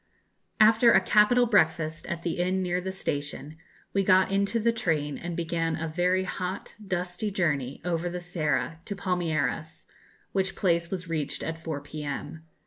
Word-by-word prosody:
After 225 +2 +7
a 190 - +7
capital 210 +6 +4
breakfast 165 -7 +1
at 170 -1 -4
the 175 0 -2
inn 185 +1 +1
near 180 0 0
the 190 +1 -3
station, 150 -3 -4 0.4
we 195 - +3
got 185 0 +4
into 200 +3 +1
the 230 +1 +3
train 155 -10 -1
and 170 -1 -5
began 165 -1 -1
a 165 0 -3
very 180 +3 +1
hot 185 +1 -4
dusty 180 +1 -2
journey 145 -9 -1
over 175 0 -1
the 180 +1 -4
Serra 165 -2 -1
to 200 - -4
Palmeiras, 165 -4 -2 0.5
which 190 0 0
place 170 -2 +1
was 185 -2 -4
reached 155 -4 -2
at 165 0 -4
4 155 -4 -3
p.m. 145 +1 -6
175 Hz, 160 wpm, -27 LUFS, 160-190 Hz, 0.5 s, After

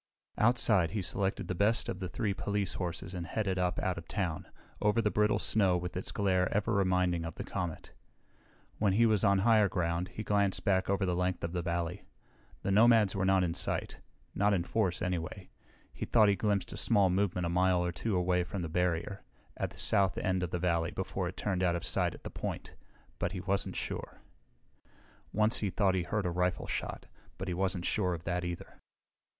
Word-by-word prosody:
Outside, 110 -6 +4
he 100 +1 -3
selected 100 -1 -1
the - - -1
best 105 +6 +2
of 95 - -4
the 90 -2 -4
three 100 +2 -1
police 100 -1 -2
horses 90 0 -4
and 90 -2 -5
headed 95 -4 -1
up 90 0 0
out 90 -2 -1
of 85 - -13
town, 90 -6 -3 0.3
over 105 +2 +2
the 105 -2 +1
brittle 105 0 +2
snow 95 -5 +2
with 90 0 -5
its 95 - -4
glare 95 -2 +1
ever 105 +3 0
reminding 90 -3 +2
of 80 - -6
the - - -5
comet. 85 -3 -5 0.9
When 100 -3 +2
he 115 +4 +4
was 110 -3 +2
on 100 -1 +4
higher 105 0 +4
ground, 85 -1 -1
he 110 - -7
glanced 100 -2 +1
back 95 -3 +2
over 100 0 +1
the 90 -1 0
length 90 0 -1
of 85 - -2
the 90 - -1
valley. 85 +1 -3 0.6
The 100 - 0
nomads 110 -1 +5
were 95 0 0
not 95 -1 +4
in 85 -2 0
sight. - - -1 0.3
Not 100 0 +2
in 85 - 0
force, 95 -2 0
anyway. 90 -3 -3 0.4
He - - -5
thought 110 -3 +5
he 100 - +3
glimpsed 100 -2 -1
a - - -7
small 100 -5 +3
movement 90 -2 0
a - - -1
mile 90 0 +2
or 90 - -1
two 105 +4 -2
away 90 0 +2
from 90 +1 -5
the 80 - -4
barrier, 90 +3 -1 0.3
at - - -2
the - - -15
south 95 -2 +1
end 95 -1 0
of 90 - -2
the 90 - -2
valley 85 -2 0
before 95 -1 -3
it 90 - -7
turned 95 -3 -1
out 90 -2 +2
of 85 - -4
sight - - 0
at - - -15
the - - -6
point, - - -5 0.5
but 90 - -1
he 95 - -4
wasn't 100 +1 -1
sure. - - -5 1.1
Once 110 +2 +3
he 105 - -1
thought 95 0 +2
he 95 - +1
heard 105 +3 -2
a 90 - 0
rifle 90 +1 0
shot, - - -4 0.3
but 95 - -5
he 90 - -1
wasn't 95 -1 -1
sure 90 -4 +1
of 85 - -9
that, 90 +1 -2
either. 85 -1 -6
95 Hz, 210 wpm, -31 LUFS, 90-100 Hz, 1.1 s, nomads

